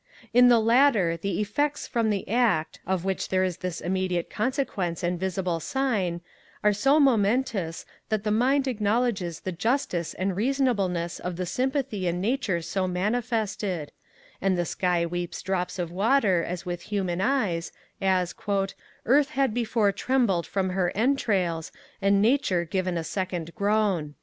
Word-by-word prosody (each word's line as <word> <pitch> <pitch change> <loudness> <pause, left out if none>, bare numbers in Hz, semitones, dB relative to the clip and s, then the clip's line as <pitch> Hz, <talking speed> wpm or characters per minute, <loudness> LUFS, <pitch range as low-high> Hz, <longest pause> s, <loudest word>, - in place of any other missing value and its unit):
In 245 +1 +7
the 240 -1 +6
latter, 225 -6 +4
the 175 +2 -3
effects 290 +8 -1
from 230 -2 0
the 200 -2 -1
act, 215 -8 +1
of 185 -1 -1
which 190 -1 -2
there 185 0 +2
is 185 -2 -1
this 180 -2 -4
immediate 180 -1 -1
consequence 210 - -2
and 175 0 -1
visible 185 -2 -1
sign, 200 - -1 0.4
are 210 0 +4
so 270 +9 +3
momentous, 220 - +1 0.2
that 215 -2 0
the 210 - 0
mind 265 +5 +2
acknowledges 210 -6 0
the 185 - -3
justice 185 - -1
and 190 0 -1
reasonableness 205 -8 0
of 180 -1 -4
the 180 +1 -3
sympathy 255 - -1
in 175 +1 -1
nature 200 -5 0
so 185 +2 -1
manifested; 205 - -1 0.5
and 190 -1 +2
the 175 - 0
sky 175 -1 0
weeps 175 +1 -4
drops 180 -1 -2
of 175 -2 -3
water 200 -2 +2
as 175 0 -4
if - - -22
with 175 -1 -4
human 185 -4 -1
eyes, 200 -9 0 0.3
as 185 -2 +1 0.7
'Earth 280 +4 +4
had 270 -5 +1
before 225 -3 +1
trembled 210 -5 +1
from 190 -2 -1
her 180 -1 0
entrails, 200 - 0 0.3
and 200 0 +3
Nature 215 -8 +2
given 185 0 -1
a 165 - -2
second 175 -2 -4
groan.' 200 -8 0
195 Hz, 155 wpm, -26 LUFS, 180-235 Hz, 0.7 s, In